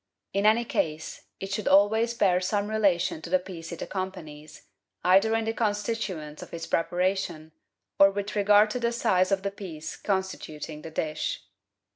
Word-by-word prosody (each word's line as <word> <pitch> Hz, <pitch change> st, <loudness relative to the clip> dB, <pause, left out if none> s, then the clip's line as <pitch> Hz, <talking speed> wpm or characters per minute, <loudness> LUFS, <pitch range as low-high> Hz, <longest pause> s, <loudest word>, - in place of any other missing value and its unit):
In 200 Hz, +1 st, +2 dB
any 230 Hz, +2 st, +4 dB
case, 160 Hz, -7 st, -3 dB
it 195 Hz, 0 st, -6 dB
should 210 Hz, +1 st, -2 dB
always 220 Hz, +4 st, +4 dB
bear 185 Hz, -5 st, +3 dB
some 205 Hz, +2 st, -1 dB
relation 195 Hz, -7 st, +1 dB
to 170 Hz, -, -8 dB
the 185 Hz, -, +4 dB
piece 180 Hz, -3 st, -9 dB
it 170 Hz, -, -5 dB
accompanies, 155 Hz, -6 st, -7 dB, 0.4 s
either 195 Hz, +5 st, +4 dB
in 225 Hz, 0 st, 0 dB
the 225 Hz, -, -1 dB
constituents 205 Hz, -8 st, -2 dB
of -, -, -10 dB
its 165 Hz, -, -5 dB
preparation 175 Hz, -2 st, -1 dB, 0.5 s
or 195 Hz, -, +8 dB
with 205 Hz, +1 st, -4 dB
regard 205 Hz, +1 st, +5 dB
to 250 Hz, -, -2 dB
the 235 Hz, -1 st, 0 dB
size 185 Hz, -5 st, +2 dB
of 195 Hz, -1 st, +1 dB
the 200 Hz, -, -1 dB
piece 175 Hz, -6 st, -7 dB
constituting 160 Hz, -6 st, -4 dB
the 165 Hz, -, -8 dB
dish. 155 Hz, -1 st, -3 dB
190 Hz, 165 wpm, -27 LUFS, 165-210 Hz, 0.5 s, or